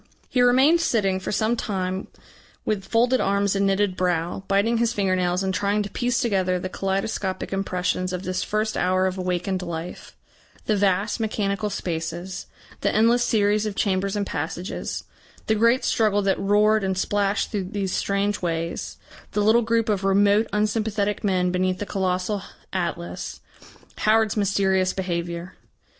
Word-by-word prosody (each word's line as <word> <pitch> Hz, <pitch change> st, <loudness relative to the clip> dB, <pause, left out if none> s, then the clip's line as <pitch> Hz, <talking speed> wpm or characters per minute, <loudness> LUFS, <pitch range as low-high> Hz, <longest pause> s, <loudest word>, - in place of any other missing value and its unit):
He 250 Hz, -, +2 dB
remained 265 Hz, +7 st, +5 dB
sitting 195 Hz, -, +1 dB
for 190 Hz, -, -4 dB
some 220 Hz, +2 st, +1 dB
time 190 Hz, -4 st, -3 dB, 0.6 s
with 200 Hz, -3 st, -1 dB
folded 245 Hz, +3 st, +2 dB
arms 200 Hz, 0 st, +1 dB
and 195 Hz, 0 st, +2 dB
knitted 195 Hz, -1 st, +1 dB
brow, 175 Hz, 0 st, -1 dB
biting 215 Hz, +4 st, +2 dB
his 235 Hz, 0 st, +1 dB
finger 195 Hz, -3 st, +1 dB
nails 180 Hz, +1 st, 0 dB
and 190 Hz, 0 st, -1 dB
trying 205 Hz, +2 st, +1 dB
to 200 Hz, -, -7 dB
piece 245 Hz, 0 st, 0 dB
together 190 Hz, -7 st, +1 dB
the 185 Hz, +1 st, -4 dB
kaleidoscopic 195 Hz, 0 st, -2 dB
impressions 185 Hz, -1 st, -1 dB
of 180 Hz, 0 st, -4 dB
this 185 Hz, 0 st, -2 dB
first 215 Hz, +1 st, -1 dB
hour 185 Hz, +1 st, +2 dB
of 185 Hz, 0 st, -2 dB
awakened 185 Hz, +1 st, -1 dB
life; 170 Hz, -1 st, -7 dB, 0.5 s
the 215 Hz, -, +2 dB
vast 200 Hz, +2 st, +1 dB
mechanical 210 Hz, -1 st, -1 dB
spaces, 175 Hz, +1 st, -4 dB, 0.3 s
the -, -, +1 dB
endless 235 Hz, +3 st, +4 dB
series 210 Hz, -2 st, +2 dB
of 205 Hz, -, -4 dB
chambers 195 Hz, 0 st, 0 dB
and 205 Hz, -1 st, -1 dB
passages, 165 Hz, +3 st, -4 dB, 0.4 s
the 220 Hz, -, +2 dB
great 230 Hz, +4 st, +3 dB
struggle 205 Hz, -2 st, +2 dB
that 195 Hz, -1 st, +1 dB
roared 210 Hz, +2 st, +3 dB
and 190 Hz, -1 st, -1 dB
splashed 200 Hz, +1 st, 0 dB
through 200 Hz, -4 st, -2 dB
these 190 Hz, 0 st, -3 dB
strange 200 Hz, +1 st, 0 dB
ways, 165 Hz, -1 st, -3 dB, 0.4 s
the 210 Hz, -, +1 dB
little 220 Hz, +3 st, +5 dB
group 230 Hz, 0 st, +1 dB
of 205 Hz, -3 st, 0 dB
remote 200 Hz, +2 st, +4 dB
unsympathetic 210 Hz, 0 st, 0 dB
men 185 Hz, -3 st, +1 dB
beneath 185 Hz, 0 st, 0 dB
the 205 Hz, -, -4 dB
colossal 190 Hz, +1 st, -1 dB, 0.3 s
Atlas, 175 Hz, -2 st, -3 dB, 0.6 s
Howard's 220 Hz, -1 st, +3 dB
mysterious 190 Hz, -2 st, +2 dB
behaviour. 175 Hz, -1 st, -3 dB
195 Hz, 155 wpm, -24 LUFS, 185-215 Hz, 0.6 s, remained